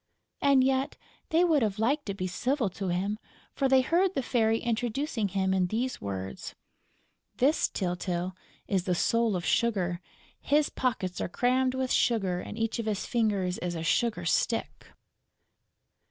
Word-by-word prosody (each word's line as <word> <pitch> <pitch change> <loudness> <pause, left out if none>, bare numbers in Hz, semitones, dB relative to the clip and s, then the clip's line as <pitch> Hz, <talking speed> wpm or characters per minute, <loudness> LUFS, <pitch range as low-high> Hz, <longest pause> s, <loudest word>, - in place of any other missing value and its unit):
And 275 -2 +5
yet 265 +1 0 0.3
they 330 +2 +4
would 320 -5 +3
have 210 -3 0
liked 270 +6 0
to 200 - -2
be 185 -2 -3
civil 235 +4 -1
to 195 +1 -4
him, 195 +4 -1 0.3
for 270 -1 +1
they 265 0 +6
heard 350 +7 +2
the 270 - 0
Fairy 225 -3 +2
introducing 240 0 -1
him 190 0 0
in 185 -1 +2
these 240 +6 -2
words: 95 -1 -5 0.8
"This, 285 +5 +2
Tyltyl, 180 0 -2 0.3
is 190 -2 0
the 180 - +1
soul 230 +3 +2
of 175 -2 -3
Sugar. 180 -2 +1 0.4
His 295 +1 +2
pockets 195 -8 -2
are - - -2
crammed 255 +5 +1
with 260 -1 -1
sugar 195 -7 +2
and - - -8
each 225 +1 -1
of 225 - -3
his 210 -2 -1
fingers 200 -6 0
is 175 -1 -3
a 165 - -4
sugar 210 0 +1
stick." 230 +7 -1
220 Hz, 160 wpm, -28 LUFS, 185-260 Hz, 0.8 s, they